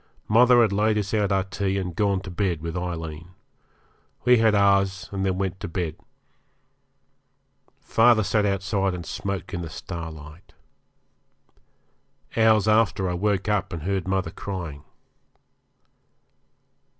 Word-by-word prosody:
Mother 120 +2 +6
had 110 - +1
laid 105 +2 +2
us 100 0 -2
out 105 -2 +1
our 95 -1 +2
tea 95 0 -2
and 90 -3 -4
gone 100 -1 +1
to 95 - -8
bed 90 -3 -1
with 85 +1 -4
Aileen. 85 -1 -5 0.9
We 125 -1 +6
had 110 -2 +4
ours 100 -2 +2
and 100 -1 -3
then 95 -1 0
went 95 -1 -2
to 100 - -5
bed. 85 -3 -3 1.9
Father 115 -1 +4
sat 105 +1 +1
outside 100 -1 0
and 85 -2 -7
smoked 100 -2 -5
in 90 - -3
the 85 - -6
starlight. 80 +1 -9 1.8
Hours 110 -2 +4
after 110 -3 +2
I 90 - -1
woke 100 +2 0
up 105 -3 0
and 85 -4 -5
heard 95 0 -2
mother 95 0 -1
crying. 85 -7 -6
95 Hz, 135 wpm, -24 LUFS, 90-105 Hz, 1.9 s, Mother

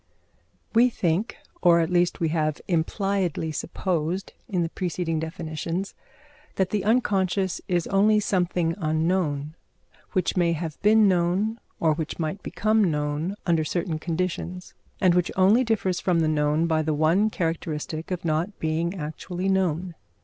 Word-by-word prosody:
We 240 +2 +5
think, 185 0 -1 0.2
or 170 -2 +6
at 165 +1 0
least 175 -1 +2
we 165 - +1
have 155 -2 0
impliedly 180 -1 0
supposed 170 +3 -2 0.2
in 180 -5 0
the 165 - -2
preceding 175 -2 -2
definitions, 165 +3 -4 0.6
that 190 -1 0
the 205 -3 0
unconscious 195 -4 +1
is 175 -3 +1
only 210 +2 +4
something 180 -4 0
unknown, 155 -2 0 0.6
which 185 -3 0
may 170 -2 +2
have 160 -2 -5
been 215 +1 +5
known, 190 +5 +1 0.2
or 160 -2 +3
which 155 0 -4
might 170 +4 -3
become 215 +1 +1
known 150 +4 -2
under 165 -3 +2
certain 165 0 -2
conditions, 180 +2 -3 0.3
and 185 -3 +4
which 175 -1 +2
only 200 +7 +5
differs 205 -6 0
from 175 -3 +1
the 160 - +2
known 150 +1 +2
by 160 -1 +1
the 155 -1 0
one 165 +8 +3
characteristic 160 -3 -3
of 180 -2 -4
not 165 +6 -1
being 165 +3 -1
actually 175 +3 -4
known. 180 -2 0
175 Hz, 145 wpm, -25 LUFS, 160-190 Hz, 0.6 s, or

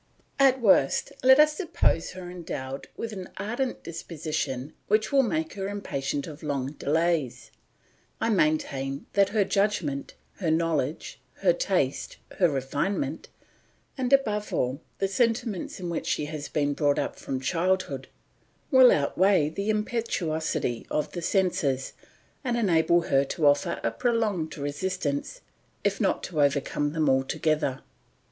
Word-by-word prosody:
At 265 -1 +5
worst 190 - +3
let 265 +2 +7
us 300 0 +6
suppose 305 - 0
her 185 -1 -8
endowed 140 -6 -6
with 230 -1 -4
an 190 -3 -7
ardent 240 +6 -3
disposition 155 -5 -4
which 215 +1 +2
will 275 -1 +5
make 160 -9 -1
her 195 -1 -4
impatient 145 -8 -3
of 155 -2 -9
long 140 -3 -2
delays; 155 -2 -1 0.7
I 225 - 0
maintain 140 -6 0
that 200 -1 +4
her 210 -1 +2
judgment, 185 -9 -1 0.2
her 175 -5 -1
knowledge, 160 -3 -1 0.2
her - - +5
taste, - - -1 0.2
her 175 -3 +5
refinement, 145 - -2 0.7
and, 255 -2 -2
above 210 -7 +2
all, 130 +4 -1 0.2
the 195 - 0
sentiments 225 -2 -1
in 180 - -4
which 170 -1 -3
she 150 - 0
has 150 -1 -6
been 145 -1 0
brought 145 -1 +1
up - - -2
from 130 - -4
childhood, 165 -1 0 0.6
will 260 -2 +8
outweigh 165 +2 +3
the 200 +6 -3
impetuosity 185 - -1
of 150 - -1
the 175 - -5
senses, 160 -8 0 0.5
and 245 -3 0
enable 170 -5 +3
her 135 -4 +2
to 155 +3 -2
offer 145 +4 +3
a - - +1
prolonged 215 -11 -1
resistance, 145 +1 -3 0.4
if - - 0
not - - +1
to 155 -4 -1
overcome 145 +1 +1
them 160 -2 +1
altogether. 135 +1 +1
165 Hz, 140 wpm, -27 LUFS, 145-205 Hz, 0.7 s, will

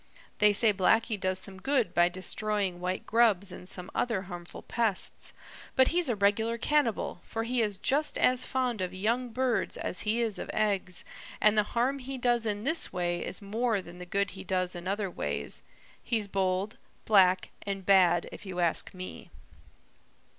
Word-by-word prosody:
They 210 0 +6
say 215 +1 +4
Blacky 220 +4 +2
does 185 -1 0
some 190 0 -5
good 270 -4 +1
by 175 0 +4
destroying 190 0 -1
white 180 +1 -3
grubs 215 -5 +3
and 180 0 -8
some 180 0 -5
other 225 -6 0
harmful 175 -2 -9
pests, 225 -5 -2 0.4
but 260 0 +5
he's 345 -4 +2
a 240 - +1
regular 210 +3 +1
cannibal, 245 -7 0
for 225 - -4
he 240 +1 0
is 210 -3 -1
just 295 +7 +1
as 255 0 +4
fond 250 -5 -1
of 185 0 -3
young 235 +6 0
birds 250 0 0
as - - -3
he 220 +2 0
is 225 -4 -1
of - - -6
eggs, 200 -4 0 0.3
and 215 0 +4
the 210 - +5 0.2
harm 265 +4 +1
he 265 +1 -6
does 240 -2 +1
in 205 0 -2
this 320 +6 +1
way 175 -1 -1
is 190 - -3
more 220 +2 0
than 175 -1 -11
the 180 - -8
good 200 +2 0
he 190 - -9
does 185 -1 0
in 175 0 -7
other 200 +1 -1
ways. 70 - -4 0.4
He's 220 -4 -1
bold, 195 +1 -1 0.3
black, 190 -3 +4
and 195 -2 -4
bad, 180 -3 +4
if - - -10
you 185 -3 -6
ask 175 +2 0
me." 185 0 -8
205 Hz, 180 wpm, -29 LUFS, 185-235 Hz, 0.4 s, They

